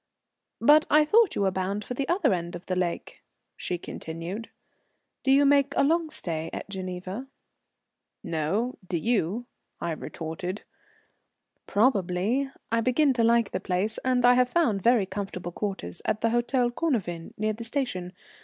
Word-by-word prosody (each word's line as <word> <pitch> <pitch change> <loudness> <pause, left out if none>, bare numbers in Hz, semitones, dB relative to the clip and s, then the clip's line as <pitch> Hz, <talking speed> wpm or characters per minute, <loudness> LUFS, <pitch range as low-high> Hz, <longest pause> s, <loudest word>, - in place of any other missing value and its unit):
"But 300 +6 +6
I 300 0 +5
thought 435 +4 +4
you 200 - +1
were 190 - +2
bound 190 +3 -2
for - - -4
the 270 +2 -3
other 345 - +3
end 175 -1 -3
of 175 - -9
the 185 - -2
lake," 180 -2 -3 0.3
she 180 - -3
continued. 170 +6 -6 0.7
"Do 265 - +2
you 280 +1 +6
make 280 0 +3
a - - +5
long 325 +2 +2
stay 165 - -3
at - - -6
Geneva?" 190 +4 -5 1.0
"No. 190 +11 -1
Do 175 - -1
you?" 220 +2 0 0.3
I 170 - -2
retorted. 165 +4 -5 1.0
"Probably. 210 +3 +1 0.2
I 230 0 +2
begin 265 +4 +3
to 235 -2 +1
like 230 -1 +3
the - - -2
place, 190 +5 -1
and 255 -1 +2
I 245 - +8
have 250 0 +3
found 250 - +2
very 230 -1 +4
comfortable 185 -3 -5
quarters 190 - -4
at 215 - -1
the 230 - +3
Hôtel 240 +1 +1
Cornavin, 205 - -2
near 215 +1 0
the 225 +2 -7
station. 225 -8 -2
215 Hz, 160 wpm, -27 LUFS, 180-255 Hz, 1.0 s, I